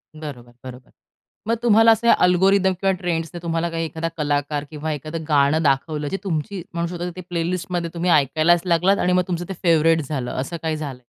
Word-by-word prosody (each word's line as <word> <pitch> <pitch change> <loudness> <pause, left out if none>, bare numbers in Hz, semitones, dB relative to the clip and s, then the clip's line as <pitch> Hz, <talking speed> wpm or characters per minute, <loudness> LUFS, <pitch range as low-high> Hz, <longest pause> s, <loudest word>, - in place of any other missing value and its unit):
बरोबर, 125 -6 -9
बरोबर. 125 -1 -11 0.6
मग 230 - +2
तुम्हाला 225 0 +6
असं 230 +1 +2
अल्गोरिदम 190 +1 +3
किंवा 195 0 +3
ट्रेंड्सचं 165 -1 -3 0.2
एखादा 165 0 -3
कलाकार 145 0 -1
किंवा 155 +1 -4
एखादं 155 +3 -6
गाणं 145 +2 +3
दाखवलं, 145 +2 0
जे 195 - -2
तुमची 175 +1 -3
म्हणू 170 0 -1
शकता 175 0 -4
की 185 - -7
प्ले 170 -1 -1
लिस्टमध्ये 175 -1 -3
तुम्ही 175 +1 -1
ऐकायलाच 155 +4 +3
लागलात 180 +3 +3
आणि 180 0 +1
मग 180 0 +3
तुमचं 175 -1 -3
ते - - -3
फेवरेट 165 -1 +4
झालं, 130 -5 -3
असं 135 +6 -4
काही 160 -1 -1
झालंय? 135 -5 -7
165 Hz, 175 wpm, -22 LUFS, 150-180 Hz, 0.6 s, तुम्हाला